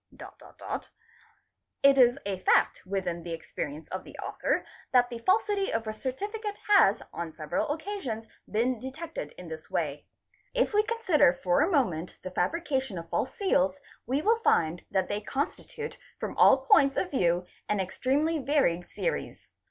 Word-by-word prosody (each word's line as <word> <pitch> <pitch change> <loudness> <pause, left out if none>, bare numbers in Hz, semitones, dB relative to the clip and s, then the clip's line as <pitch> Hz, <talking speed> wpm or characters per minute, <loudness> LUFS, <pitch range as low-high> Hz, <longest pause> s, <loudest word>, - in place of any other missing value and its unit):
It 275 0 +7
is 245 0 +6
a 195 -2 -2
fact 185 - +2
within 180 -3 -2
hs 170 - -6
experience 155 -1 -6
of 185 - -4
the - - -12
author - - -1 0.3
that 245 -1 +4
the 235 - -5
falsity 395 - +2
of 225 0 -1
a 215 - -2
Noni 255 +4 -3 0.3
cate 415 -2 -4
has 390 - +5
on 170 -1 -4
several 155 - -2
occasions 300 - -4 0.2
been 235 +3 +1
detected 265 - -6
in 180 - -9
this 160 -1 -8
way. 145 -3 -2 0.5
If - - +2
we 420 - +5
consider 415 - +3
for 180 +6 +3
a 320 - +3
moment 185 - 0
the 185 - -5
fabrication 270 - -1
of 165 0 -7
false 255 - -1
seals 190 - +2
"8, - - -23 0.3
we 270 +4 +1
will 450 +2 +3
find 170 - +2
that 190 -1 +1
they 205 +1 -2
constitute 290 - -4 0.2
from - - -4
all 265 0 +6
points 275 0 +5
of 370 - 0
view 180 -8 +2 0.2
an 210 - +1
extremely 280 - 0
varied 260 - +1
series. - - -4
245 Hz, 160 wpm, -28 LUFS, -, 0.5 s, It